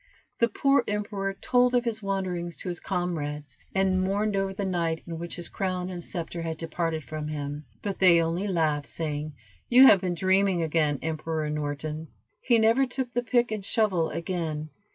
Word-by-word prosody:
The 235 - +5
poor 275 +5 +3
emperor 205 -1 -2
told 250 +4 +2
of 245 0 +2
his 220 -2 -2
wanderings 185 -4 -2
to 185 - -6
his 175 - -4
comrades, 150 -7 -3 0.2
and 190 -1 +2
mourned 205 +2 0
over 195 0 0
the 195 +1 -3
night 170 -3 -1
in 165 -1 -6
which 170 0 -5
his 175 - -5
crown 185 -1 -2
and 175 -1 -6
scepter 170 0 -5
had 165 -1 -3
departed 165 -1 -2
from 155 0 -5
him, 145 0 -4 0.2
but 200 -2 -3
they 180 -3 +6
only 165 +4 0
laughed, 155 -6 0
saying, 150 -2 -2 0.3
"You 255 +2 +9
have 200 -8 +8
been 180 -2 -1
dreaming 190 -1 +2
again, 155 -2 +1
Emperor 160 0 -2
Norton." 150 +1 -3 0.3
He 240 -2 +4
never 230 +4 +4
took 250 -1 -4
the 245 - +1
pick 240 -1 +1
and 215 -2 -3
shovel 190 -6 +2
again. 160 -4 -3
180 Hz, 180 wpm, -27 LUFS, 160-200 Hz, 0.3 s, You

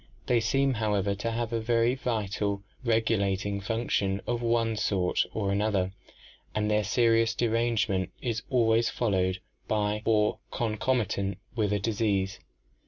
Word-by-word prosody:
They 120 -1 +3
seem, 135 +5 +2
however, 105 -3 0
to 110 +4 -3
have 115 0 -2
a 115 - 0
very 115 +1 +2
vital 105 -5 -2 0.2
regulating 100 -4 +1
function 105 -3 0
of 120 -1 -1
one 115 -1 +1
sort 95 -4 +1
or 100 -3 -1
another 100 -2 0 0.6
and 105 0 +1
their 105 0 +2
serious 115 +1 +3
derangement 115 -4 +1
is 115 -3 -2
always 115 -2 +3
followed 95 -5 0 0.3
by 105 0 0
or 105 -1 +2
concomitant 110 -4 -1 0.2
with 105 -3 +1
disease. 100 -3 0
110 Hz, 125 wpm, -28 LUFS, 100-115 Hz, 0.6 s, They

